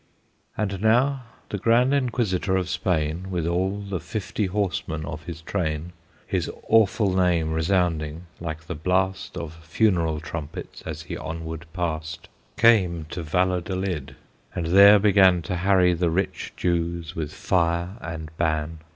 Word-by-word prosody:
And 100 -3 -2
now 125 +4 +3 0.2
the 105 - -3
Grand 120 +5 +3
Inquisitor 115 -8 0
of 90 -1 -2
Spain, 85 +1 -1
With 90 -4 -2
all 95 +4 0
the 100 -2 -4
fifty 100 +3 -3
horsemen 90 -5 -2
of 80 -1 -7
his 80 -2 -7
train, 80 -2 -2 0.3
His - - -1 0.2
awful 105 -3 +3
name 85 -4 +2
resounding, 80 -2 0 0.2
like 80 -2 -5
the 90 - -4
blast 95 +3 -1
Of 85 -2 -5
funeral 85 -3 +1
trumpets, 80 0 -7
as - - -5
he - - -6
onward 80 +1 -6
passed, 80 -3 -4 0.3
Came 95 -8 +4
to 90 - -4
Valladolid, 90 -3 -1 0.4
and 85 - -2
there 100 +4 +8
began 95 -4 +5
To 90 +3 -3
harry 90 -1 +4
the 85 0 +1
rich 90 +4 -2
Jews 85 -1 -1
with 75 -3 -3
fire 85 -1 0
and 80 -1 -7
ban. 80 -1 -1
90 Hz, 140 wpm, -24 LUFS, 80-95 Hz, 0.4 s, there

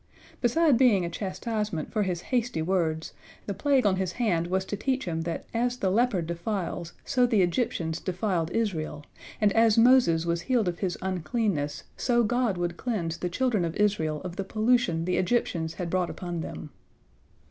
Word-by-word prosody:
Beside 270 +1 +3
being 215 -9 +4
a 170 - -4
chastisement 205 -1 -3
for 215 - 0
his 180 -4 -1
hasty 240 -9 +1
words, 160 -3 -1 0.3
the 200 - -3
plague 265 +5 +2
on 190 -2 +3
his 185 -2 -2
hand 175 -9 0
was 190 +1 0
to 205 - -3
teach 265 +5 -1
him 165 -2 -2
that 165 0 -4
as 245 +2 0
the 190 -5 0
leper 215 -4 +2
defiles, 170 0 -3
so 250 -3 +3
the 220 -6 +3
Egyptians 170 -4 -1
defiled 180 -3 -1
Israel, 160 -8 -2 0.3
and 210 -2 +3
as 225 -1 +4
Moses 225 -9 +5
was 170 0 0
healed 230 +1 +1
of 175 -1 -2
his 185 -3 -2
uncleanness, 180 -4 -1
so 240 -2 +2
God 235 -3 +1
would 175 0 -2
cleanse 175 -9 -2
the 180 +1 -3
children 225 0 +1
of 165 -1 -2
Israel 175 -8 +1
of 180 0 -6
the 195 - -1
pollution 215 -5 +1
the 180 - 0
Egyptians 175 -5 0
had 180 - -3
brought 185 -2 +1
upon 175 -2 -5
them. 150 - -7
190 Hz, 180 wpm, -27 LUFS, 170-230 Hz, 0.3 s, Moses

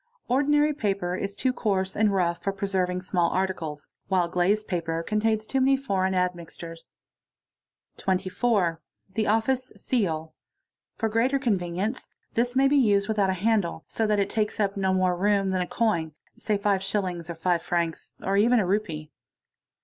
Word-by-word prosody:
Ordinary 295 +4 +3
paper 195 -8 -1
is 200 +1 -4
too 255 +4 0
coarse 190 -5 -1
and 215 -1 +3
'rough 175 -3 0
for 195 - 0
preserving 190 -2 -1
small 175 -2 +1
articles, 180 -6 -3 0.2
while 180 -2 +2
glazed 190 +5 +1
paper 165 -2 -2
contains 215 +2 0
too 270 - 0
many 270 +1 +4
foreign 190 -8 0
admixtures.. 170 -2 -4 1.1
q - - -12
24. 190 -1 +1 0.3
The 215 +1 0
office 245 +4 +1
seal. 160 -10 -1 0.6
For 225 - -1
greater 230 +5 +2
convenience 200 -2 -1 0.2
this 245 +2 0
may 270 +1 +5
be 285 +1 +3
used 205 -6 +3
with 220 -1 -1
it 195 -1 +3
a - - +2
handle, 185 -4 0
so 225 - -1
that 210 -1 +2
it 200 - 0
takes 215 0 -1
up 200 -2 +1
no 190 -1 +1
more 185 -1 +2
room 195 +1 +2
than 185 -1 0
a 180 - -2
coin, 170 -9 0 0.2
say 210 - -1
five 200 -1 +1
lillings 180 -4 -2
or 170 - -4
five 170 +1 +1
francs, 170 -1 -2
or 195 - 0
even 230 +5 +4
a 210 - +2
rupee. 175 -6 -2
195 Hz, 170 wpm, -26 LUFS, 180-220 Hz, 1.1 s, may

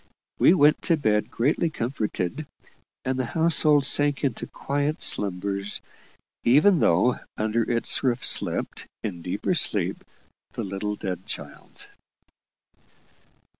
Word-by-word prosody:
We 175 - +6
went 150 -2 +4
to 165 -3 +3
bed 105 -7 +1
greatly 145 +7 +1
comforted, 120 - -3 0.6
and 130 0 -1
the 130 - 0
household 155 -3 +4
sank 145 0 +2
into 130 -6 -1
quiet 145 +2 -2
slumbers, 100 +1 -1 0.6
even 150 +9 +5
though 95 +7 +3 0.2
under 110 +1 0
its 115 -1 -1
roof 125 -2 0
slept, - - -1 0.2
in 90 -5 -4
deeper 90 - -1
sleep, - - -1 0.5
the - - -4
little 100 +2 -3
dead 95 -3 -5
child. - - -8
125 Hz, 115 wpm, -25 LUFS, 105-145 Hz, 0.6 s, We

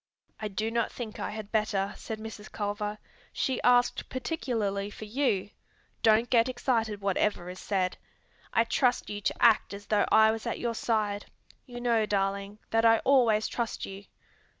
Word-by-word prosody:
"I 215 - -3
do 215 +2 -2
not 235 -1 0
think 225 -3 -7
I - - -2
had 215 -1 -7
better," 205 -3 0
said 220 - -6
Mrs. 215 -1 -9
Culver. 210 0 -3 0.3
"She 260 - -1
asked 245 0 +3
particularly 225 -8 -2
for 215 - -9
you. 210 -4 0 0.5
Don't 225 +1 +4
get 235 0 +4
excited 230 -4 -1
whatever 195 -2 0
is 185 - -10
said. 185 -3 -1 0.5
I 230 - +4
trust 245 0 +1
you 205 0 -5
to - - 0
act 225 -3 +4
as 205 0 -10
though 210 -1 +2
I 220 0 +7
was 225 +1 -4
at 230 - -2
your 235 -1 -2
side. 215 -3 -1 0.4
You 245 -1 -7
know, 230 -3 +2
darling, 200 0 -1
that 225 0 +3
I 225 0 +6
always 235 -6 +4
trust 235 -2 -3
you." 195 +1 -9
215 Hz, 170 wpm, -29 LUFS, 205-235 Hz, 0.5 s, I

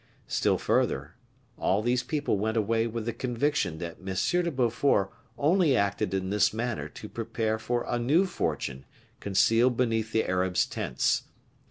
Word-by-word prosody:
Still - - +1
further; 70 +4 0 0.5
all 100 +3 +1
these 125 +1 +2
people 145 -7 -1
went 110 +2 -1
away 115 +1 +1
with 115 -1 -4
the 120 - -2
conviction 125 - -1
that 85 0 -6
M. 95 0 -4 0.3
de 170 - 0
Beaufort 120 - +1 0.3
only 155 -3 +3
acted 100 -3 0
in 95 0 -2
this 105 0 +3
manner 115 +1 -3
to 105 - -9
prepare 110 -1 -2
for 120 +2 -1
a 120 - -1
new 150 +11 +3
fortune 65 - -3 0.3
concealed 115 +5 +3
beneath 115 -3 0
the 110 - +1
Arabs' 90 0 +1
tents. - - -1
115 Hz, 155 wpm, -28 LUFS, 100-125 Hz, 0.5 s, only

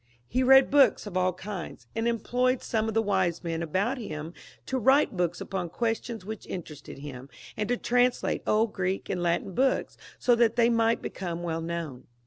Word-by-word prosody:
He 255 - 0
read 265 +1 +6
books 275 -7 +5
of 205 -3 -8
all 185 0 +2
kinds, 185 0 -7
and 225 +1 0
employed 245 +2 0
some 220 -1 0
of 225 - -3
the 225 - +3
wise 190 -5 0
men 165 -1 -2
about 195 - -1
him 160 -6 -6 0.3
to 265 - -1
write 265 -1 +4
books 175 -1 -1
upon 180 -3 -4
questions 225 +1 -3
which 220 0 -7
interested 155 -5 -8
him, 135 -2 -9 0.3
and 210 0 -2
to 245 - +1
translate 245 +1 +1
old 215 0 +2
Greek 190 0 -2
and 180 - -2
Latin 175 +3 0
books, 265 +6 +1 0.2
so 245 - +3
that 235 -1 +3
they 235 0 +4
might 230 0 +2
become 175 -2 -4
well 165 -1 -2
known. 165 -6 -5
205 Hz, 185 wpm, -27 LUFS, 175-235 Hz, 0.3 s, read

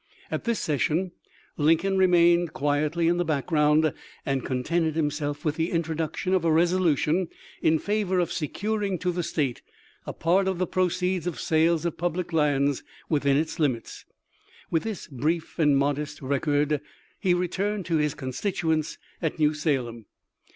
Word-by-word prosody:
At - - -3
this 235 -2 0
session 160 +4 0 0.5
Lincoln 165 +6 +3
remained 175 -2 +4
quietly 150 +4 0
in 175 +1 +3
the 175 - +1
background, 150 0 +2 0.3
and 135 -1 -1
contented 155 +5 0
himself 145 0 -2
with 150 -1 0
the 165 +1 0
intro 165 -1 -1
duction 165 +4 -2
of 185 -3 +2
a 165 - +3
resolution 170 0 +2 0.3
in 160 0 +4
favor 200 +1 0
of 175 -2 +1
securing 200 +4 -2
to 180 +1 -1
the 175 0 -2
State 140 -7 -2 0.5
a - - -2
part 185 +4 +2
of 190 -2 0
the 185 - +1
proceeds 180 0 0
of 175 - -3
sales 160 +1 +2
of 170 - -3
public 175 0 -2
lands 145 -3 +2 0.3
within 140 -3 +2
its 160 +3 -2
limits. 130 -7 -1 0.7
With 165 - +2
this 220 -5 -4
brief 155 +6 -2
and 145 -3 +4
modest 145 +2 -1
rec 140 +2 -2
ord 145 0 +2 0.4
he 185 -4 +2
returned 190 +3 -1
to 165 -2 +1
his 150 -1 0
constituents 160 +3 -2 0.2
at 160 -3 -1
New 155 -1 +3
Salem. 125 - -2
160 Hz, 160 wpm, -26 LUFS, 150-180 Hz, 0.7 s, remained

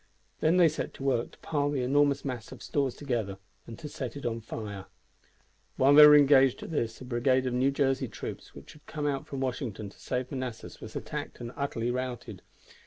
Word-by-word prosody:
Then 165 +3 +3
they 175 -2 +7
set - - -3
to - - -8
work 130 -4 +1
to - - -19
pile 145 -2 0
the 140 -3 -1
enormous 140 +2 +2
mass 125 -4 -5
of 130 - -10
stores 135 -4 -1
together 115 -9 -3 0.3
and 115 - -8
to 155 - -7
set 135 -2 -6
it 140 - -8
on 115 -1 -2
fire. 105 -3 -6 0.9
While 135 +2 +5
they 150 +1 +11
were 150 - +9
engaged 135 -3 +5
at - - -7
this 115 -7 -2
a - - -7
brigade 130 +1 +1
of 125 - -1
New 130 +2 +3
Jersey 135 -1 +1
troops - - -8
which - - -12
had 150 - -19
come 150 -2 -4
out 140 -2 -1
from 135 -1 -5
Washington 120 -5 -3
to - - -20
save 125 0 -3
Manassas 130 -4 -6
was - - -9
attacked - - -5
and 120 0 -6
utterly 120 -4 -2
routed. 125 -1 -4
130 Hz, 210 wpm, -29 LUFS, 120-145 Hz, 0.9 s, they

